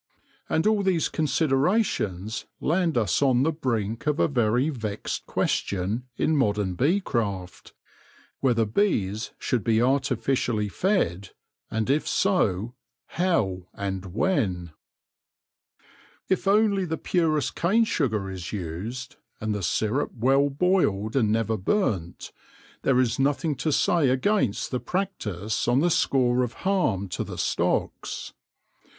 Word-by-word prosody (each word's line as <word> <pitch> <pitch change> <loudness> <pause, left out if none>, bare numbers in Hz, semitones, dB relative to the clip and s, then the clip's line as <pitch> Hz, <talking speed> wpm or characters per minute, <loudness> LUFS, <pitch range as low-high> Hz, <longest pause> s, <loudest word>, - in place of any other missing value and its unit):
And 160 - +1
all 215 -1 +3
these 185 -4 +1
considerations 140 - 0
land 170 -2 +1
us 105 -2 +1
on 130 -2 +3
the 160 - +2
brink 115 -6 -2
of 150 +1 +1
a - - +4
very 125 0 +1
vexed 110 -7 -4
question 100 +6 -1
in 160 - +2
modern 105 -8 +1
bee 150 - +2
craft 100 - -4 0.3
— - - -30
whether 120 -4 +2
bees 105 - 0
should 120 -5 -1
be 110 -1 +2
artificially 125 -4 +1
fed, 100 - 0 0.4
and 110 0 -1
if 145 +3 +1
so, 120 - +1 0.4
how 100 - 0
and 95 -2 -5
when? 95 - 0 1.6
If 190 +1 0
only 200 -1 +3
the 160 -1 -3
purest 155 -5 0
cane 215 +7 +3
sugar 110 - -1
is 90 -2 -6
used, 105 +8 -5 0.2
and 110 0 -2
the 105 - -3
syrup 110 - 0
well 135 +4 +3
boiled 140 - +1
and 110 -6 +3
never 110 0 +1
burnt, 95 - -1 0.5
there 130 -2 +3
is 125 0 +1
nothing 145 +3 +1
to 155 +4 -1
say 150 -1 +3
against 130 - +1
the 125 - -1
practice 110 - -3
on 120 +2 +3
the 175 +2 +2
score 125 -4 +2
of 120 -1 -3
harm 145 - +1
to - - -3
the - - -8
stocks. - - -1
125 Hz, 130 wpm, -25 LUFS, 105-160 Hz, 1.6 s, a